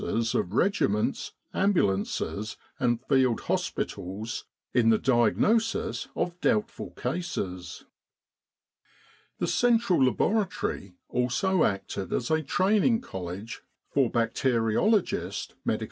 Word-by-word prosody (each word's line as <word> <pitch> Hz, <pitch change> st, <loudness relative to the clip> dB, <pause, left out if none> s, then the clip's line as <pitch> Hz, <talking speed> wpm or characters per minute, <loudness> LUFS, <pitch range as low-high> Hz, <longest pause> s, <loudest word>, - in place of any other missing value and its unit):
's 115 Hz, 0 st, 0 dB
of 90 Hz, -, 0 dB
regiments, 105 Hz, -, +1 dB, 0.2 s
ambulances, 105 Hz, -, 0 dB, 0.2 s
and 120 Hz, 0 st, 0 dB
field 130 Hz, -4 st, +3 dB
hospitals 105 Hz, +6 st, -3 dB, 0.3 s
in 120 Hz, -2 st, +4 dB
the 110 Hz, -, +5 dB
diagnosis 135 Hz, -, +2 dB
of 175 Hz, 0 st, -2 dB
doubtful 230 Hz, 0 st, 0 dB
cases. 95 Hz, -, -4 dB, 1.5 s
The -, -, -1 dB
central 235 Hz, -, +3 dB
laboratory 180 Hz, -, 0 dB
also 155 Hz, +9 st, +1 dB
acted 95 Hz, -1 st, -3 dB
as 120 Hz, -, -1 dB
a 160 Hz, 0 st, +3 dB
training 210 Hz, -, +2 dB
college 95 Hz, -, -6 dB, 0.3 s
for 135 Hz, -4 st, +3 dB
bacteriologist 120 Hz, -, +1 dB
M.O.' -, -, +2 dB
125 Hz, 95 wpm, -27 LUFS, -, 1.5 s, the